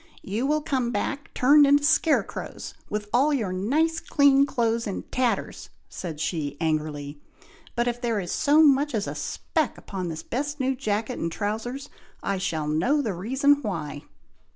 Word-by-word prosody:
"You 220 Hz, +7 st, -2 dB
will 305 Hz, +1 st, +1 dB
come 260 Hz, -5 st, 0 dB
back, 275 Hz, +6 st, -3 dB
turned 285 Hz, +3 st, +6 dB
into 285 Hz, +1 st, +4 dB
scare 315 Hz, +1 st, +3 dB
crows, -, -, -7 dB, 0.2 s
with 210 Hz, 0 st, -3 dB
all 275 Hz, +5 st, +4 dB
your 220 Hz, -10 st, -1 dB
nice 305 Hz, -, +1 dB
clean 280 Hz, -4 st, +4 dB
clothes 230 Hz, -3 st, 0 dB
in 200 Hz, -, -4 dB
tatters," 250 Hz, -2 st, -1 dB, 0.2 s
said 165 Hz, -5 st, -6 dB
she, 150 Hz, -3 st, -2 dB
angrily; 150 Hz, -2 st, -2 dB, 0.5 s
"but 240 Hz, 0 st, +1 dB
if 240 Hz, 0 st, -2 dB
there 230 Hz, -3 st, 0 dB
is 180 Hz, -3 st, -4 dB
so 305 Hz, +1 st, +4 dB
much 285 Hz, -2 st, +4 dB
as 210 Hz, -1 st, 0 dB
a -, -, -4 dB
speck 315 Hz, -5 st, -2 dB
upon 185 Hz, -3 st, -5 dB
this 160 Hz, -1 st, -5 dB
best 290 Hz, +4 st, -3 dB
new 265 Hz, 0 st, +1 dB
jacket 220 Hz, -1 st, -2 dB
and 165 Hz, -, -2 dB
trowsers, 225 Hz, -, -3 dB, 0.4 s
I 195 Hz, -1 st, -1 dB
shall 160 Hz, -5 st, -2 dB
know 215 Hz, -, +1 dB
the 215 Hz, -, -1 dB
reason 265 Hz, -, +2 dB
why." 160 Hz, -, -4 dB
235 Hz, 170 wpm, -25 LUFS, 185-280 Hz, 0.5 s, turned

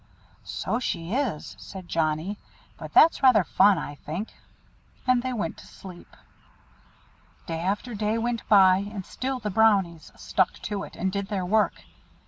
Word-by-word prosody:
"So 235 Hz, -, -3 dB
she 175 Hz, -6 st, -3 dB
is," 250 Hz, -, -2 dB
said 190 Hz, -3 st, -10 dB
Johnnie. 165 Hz, +5 st, -1 dB, 0.4 s
"But -, -, -9 dB
that's 325 Hz, -, +5 dB
rather 250 Hz, -7 st, +6 dB
fun, 200 Hz, +2 st, +4 dB
I 145 Hz, -, -5 dB
think." 160 Hz, +8 st, -6 dB, 0.8 s
And 255 Hz, -1 st, +3 dB
they 255 Hz, +1 st, -3 dB
went 205 Hz, -9 st, -3 dB
to -, -, -14 dB
sleep. 180 Hz, -3 st, -13 dB, 1.3 s
Day 165 Hz, 0 st, -4 dB
after 205 Hz, +7 st, -2 dB
day 215 Hz, +1 st, -1 dB
went 235 Hz, -1 st, -1 dB
by, 190 Hz, -3 st, +7 dB
and 200 Hz, -1 st, -5 dB
still 265 Hz, +1 st, -3 dB
the 210 Hz, -3 st, -4 dB
Brownies 190 Hz, -6 st, +2 dB
"stuck 190 Hz, -, 0 dB
to 205 Hz, -2 st, -3 dB
it," -, -, -10 dB
and 190 Hz, +1 st, -1 dB
did 200 Hz, 0 st, -3 dB
their 195 Hz, -3 st, -2 dB
work. 215 Hz, +3 st, +1 dB
200 Hz, 155 wpm, -26 LUFS, 180-225 Hz, 1.3 s, by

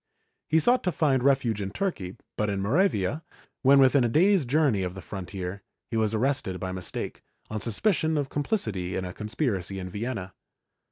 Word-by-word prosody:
He 160 Hz, -, +4 dB
sought 245 Hz, +10 st, +4 dB
to 180 Hz, -, +2 dB
find 140 Hz, -6 st, +2 dB
refuge 125 Hz, -6 st, +2 dB
in 95 Hz, -, -2 dB
Turkey, 100 Hz, -, -3 dB, 0.2 s
but 105 Hz, -1 st, 0 dB
in 100 Hz, -1 st, -1 dB
Moravia, 125 Hz, -, +1 dB, 0.4 s
when 140 Hz, +1 st, +6 dB
within 135 Hz, 0 st, +5 dB
a 120 Hz, -, +2 dB
day's 180 Hz, -, +4 dB
journey 135 Hz, -7 st, +2 dB
of 90 Hz, 0 st, -3 dB
the -, -, -7 dB
frontier, 95 Hz, 0 st, -6 dB, 0.3 s
he -, -, -2 dB
was 110 Hz, -1 st, +1 dB
arrested 110 Hz, -6 st, 0 dB
by 95 Hz, -, -3 dB
mistake, 95 Hz, -2 st, -5 dB, 0.3 s
on 110 Hz, -1 st, -3 dB
suspicion 160 Hz, -, +1 dB
of 145 Hz, -2 st, 0 dB
comphcity 110 Hz, -, -2 dB
in 95 Hz, -, -2 dB
a 90 Hz, -, -6 dB
conspiracy 105 Hz, -, -2 dB
in 90 Hz, -1 st, -5 dB
Vienna. 105 Hz, -1 st, -4 dB
115 Hz, 175 wpm, -27 LUFS, 95-145 Hz, 0.4 s, when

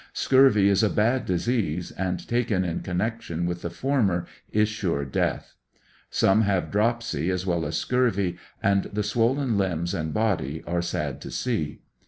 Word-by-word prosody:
Scurvy 130 Hz, -7 st, +5 dB
is 100 Hz, +1 st, +4 dB
a 110 Hz, -, +3 dB
bad 120 Hz, +6 st, +1 dB
disease, 90 Hz, -3 st, -1 dB
and 90 Hz, -1 st, -3 dB
taken 115 Hz, -6 st, +1 dB
in 85 Hz, -1 st, -2 dB
con 90 Hz, -1 st, -4 dB
nection 90 Hz, -5 st, -2 dB
with 85 Hz, 0 st, -3 dB
the 85 Hz, -, -3 dB
former 105 Hz, -9 st, 0 dB, 0.3 s
is 105 Hz, 0 st, +3 dB
sure 90 Hz, -9 st, -2 dB
death. 65 Hz, -, -2 dB, 0.6 s
Some 95 Hz, +3 st, +3 dB
have 100 Hz, -4 st, 0 dB
dropsy 105 Hz, -7 st, 0 dB
as 90 Hz, 0 st, -1 dB
well 85 Hz, -3 st, 0 dB
as -, -, -2 dB
scurvy, 100 Hz, -8 st, +1 dB, 0.3 s
and 100 Hz, -1 st, +3 dB
the 105 Hz, +1 st, -2 dB
swollen 115 Hz, +2 st, +1 dB
limbs 85 Hz, -2 st, -1 dB
and 80 Hz, -4 st, -2 dB
body 90 Hz, -9 st, -1 dB
are 85 Hz, 0 st, -1 dB
sad 80 Hz, -6 st, -3 dB
to -, -, -7 dB
see. 110 Hz, -12 st, -2 dB
100 Hz, 165 wpm, -25 LUFS, 85-115 Hz, 0.6 s, Scurvy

